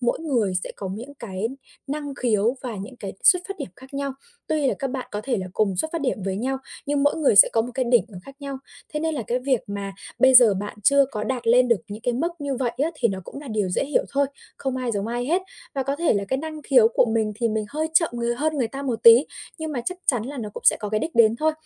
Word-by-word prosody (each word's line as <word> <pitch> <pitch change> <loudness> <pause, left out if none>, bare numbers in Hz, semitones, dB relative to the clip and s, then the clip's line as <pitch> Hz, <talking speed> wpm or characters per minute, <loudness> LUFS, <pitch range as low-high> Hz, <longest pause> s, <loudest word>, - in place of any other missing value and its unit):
mỗi 240 +3 0
người 245 - 0
sẽ - - -7
có 195 - -5
những 245 +7 -9
cái 220 -4 -4 0.4
năng 285 0 -4
khiếu 235 -1 +1
và 240 -4 -4
những 205 +7 -8
cái 195 -4 -6
xuất 360 -1 +6
phát 395 - -4
điểm - - -5
khác 265 +1 -14
nhau, 275 -1 -2 0.3
tuy 305 -3 +1
là - - +2
các 275 - -2
bạn 260 -1 -5
có 210 - -3
thể 255 -3 0
là 185 - -4
cùng 195 -2 +1
xuất 255 - 0
phát 335 - -2
điểm 255 -7 -1
với 190 -1 -2
nhau 265 +4 -2 0.3
nhưng 285 0 +1
mỗi 290 - +3
người 295 -10 +3
sẽ - - +10
có 225 - +3
một 245 - -6
cái 260 - 0
đỉnh 240 -1 +4
nó 190 -5 -10
khác 275 +5 -13
nhau, 275 -1 -5 0.4
thế 300 - -1
nên 320 0 -1
là 265 - -2
cái 245 - 0
việc 255 -2 +1
mà 200 -1 -5 0.3
bây 260 0 +5
giờ 240 -5 +8
bạn 205 +2 -5
chưa 280 +6 +5
có 210 -3 -3
đạt 255 -3 -3
lên 245 +2 +5
được 235 -4 +3
những 210 +2 -8
cái 245 0 0
mức 305 +8 0
như 280 -3 -3
vậy 245 -2 -1
á, 320 - +1
thì 250 -6 +1
nó 190 -2 -3
cũng 280 - -9
là 290 - -9
điều 210 -4 -1
dễ 180 - 0
hiểu 285 +1 +1
thôi, 280 0 +2 0.3
không 265 -1 -3
ai 255 -2 -2
giống 200 +1 -2
ai 240 +1 -2
hết. 355 +6 +1 0.3
Và 270 - 0
có 275 +2 -2
thể 335 -3 +2
là 200 -1 0
cái 265 - -1
năng 310 +1 -6
khiếu 250 -5 +5
của 235 - +2
mình 220 -2 +1
thì 230 0 0
mình 215 0 -1
hơi 310 +2 -2
chậm 330 0 +5
người 235 0 -1
hơn 305 +4 -1
người 240 -5 0
ta 275 +3 -6
một 240 -5 -3
tí 235 +5 +9 0.3
nhưng 315 -1 -4
mà 250 - -2
chắc 365 +4 -3
chắn 245 -6 +2
là 265 +6 -6
nó 215 -3 -4
cũng - - -7
sẽ - - +7
có 210 - -5
cái 215 +1 0
đích 330 - -4
đến 230 -1 +5
thôi, 315 +3 +1
250 Hz, 290 wpm, -24 LUFS, 220-280 Hz, 0.4 s, sẽ